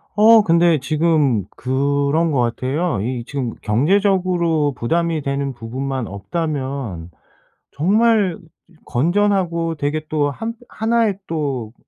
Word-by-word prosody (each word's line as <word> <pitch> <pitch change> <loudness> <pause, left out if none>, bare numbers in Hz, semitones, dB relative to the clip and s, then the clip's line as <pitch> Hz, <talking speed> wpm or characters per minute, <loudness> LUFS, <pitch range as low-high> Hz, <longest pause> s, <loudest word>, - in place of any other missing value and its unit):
어 220 +1 +7
근데 170 -3 +3
지금 150 - +1
그런 140 +4 0
것 140 - +1
같아요. 130 - -1
이 120 +2 -3
지금 130 -4 -4
경제적으로 170 - +2
부담이 165 +6 0
되는 140 0 -2
부분만 130 +2 -4
없다면 130 - -4 0.6
정말 205 +2 +2 0.5
건전하고 170 +2 +1
되게 155 +1 -2
또 145 -2 +1
한 225 - -5
1 230 +1 +1
의 195 -2 -2
또 135 -8 -3
150 Hz, 210 characters per minute, -19 LUFS, 130-175 Hz, 0.6 s, 어